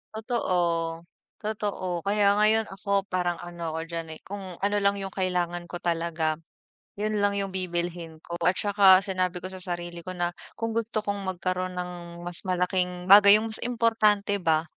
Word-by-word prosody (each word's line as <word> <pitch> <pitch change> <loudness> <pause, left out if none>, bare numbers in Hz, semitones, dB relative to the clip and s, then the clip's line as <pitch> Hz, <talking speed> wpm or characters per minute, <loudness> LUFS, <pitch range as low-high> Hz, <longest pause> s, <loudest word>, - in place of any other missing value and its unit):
Totoo, 170 -8 0 0.4
totoo. 200 -4 -2
Kaya 200 0 +3
ngayon 220 +1 +4
ako 200 0 0
parang 180 -1 0
ano 170 -2 -5
ako - - -2
diyan, 165 -1 -4
eh, - - -28
kung 200 +1 -6 0.2
ano 205 +3 0
lang 200 0 +2
yung 195 -1 -5
kailangan 175 -2 -1
ko 175 - -5
talaga, 165 -2 0 0.6
yun 210 0 -1
lang 200 0 +2
yung 195 -1 -2
bibilhin 175 -2 -3
ko 170 0 -5
at 180 - +4
saka 195 -2 +6
sinabi 185 -2 -1
ko 185 - -5
sa 190 - -7
sarili 175 -1 -4
ko 185 +2 -7
na 175 -1 -1 0.2
kung 230 0 -3
gusto 225 -1 -1
kong 200 -2 -3
magkaroon 185 0 -2
ng 175 -1 -6
mas 175 -1 -5
malaking 180 0 0
bagay, 200 0 +10
yung 220 +1 -2
mas - - -5
importante 220 -4 +2
ba, 160 -2 +2
185 Hz, 170 wpm, -27 LUFS, 175-205 Hz, 0.6 s, bagay